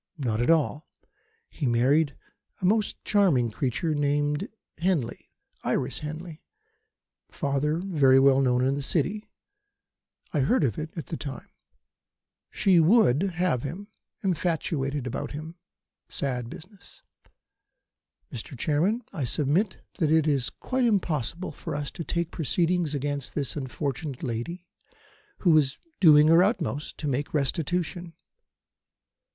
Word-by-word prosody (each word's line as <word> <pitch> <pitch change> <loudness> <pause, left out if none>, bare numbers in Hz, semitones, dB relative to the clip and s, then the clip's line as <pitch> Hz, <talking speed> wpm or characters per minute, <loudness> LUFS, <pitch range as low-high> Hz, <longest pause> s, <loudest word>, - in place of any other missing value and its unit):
Not 120 -6 -1
at 120 - +1
all. 155 -2 +2 0.6
He 145 - -3
married 135 +6 +2 0.4
a - - -2
most 210 +3 +1
charming 160 - +3
creature 135 - -1
named 145 0 0 0.3
Henley 165 -9 -1 0.3
Iris - - -1
Henley 155 +2 -7 0.9
father 140 +2 -1
very 150 -8 +4
well 135 0 +5
known 125 -1 +2
in 135 - +2
the 140 - -2
City. 185 +9 -1 1.0
I 150 - +1
heard 150 - +2
of 115 -7 0
it 155 +1 -4
at 160 - -4
the 160 - -5
time. 140 -3 -7 1.0
She 185 -3 +3
would 180 - +4
have 170 -7 +1
him 190 - -6 0.3
infatuated 155 -7 -1
about 125 - -4
him 155 +3 -7 0.6
sad 125 -4 -2
business. 190 - -14 1.3
Mr. 125 +2 -7
Chairman, 175 - +1
I 150 - -3
submit 150 - 0 0.2
that 160 -4 +2
it 160 -1 +4
is 135 -6 +1
quite 255 - -2
impossible 175 - 0
for 145 - -6
us 145 -1 -3
to 170 - -6
take 170 +1 -2
proceedings 170 0 0
against 145 -1 -3
this 135 -8 -1
unfortunate 140 +1 -4
lady, 135 +9 -4 0.8
who 170 -4 +5
is 135 -2 -1 0.2
doing 150 -4 +7
her 165 +2 +7
utmost 180 - -1
to 150 - -4
make 140 +3 -2
restitution." 170 +4 -1
150 Hz, 125 wpm, -27 LUFS, 135-175 Hz, 1.3 s, doing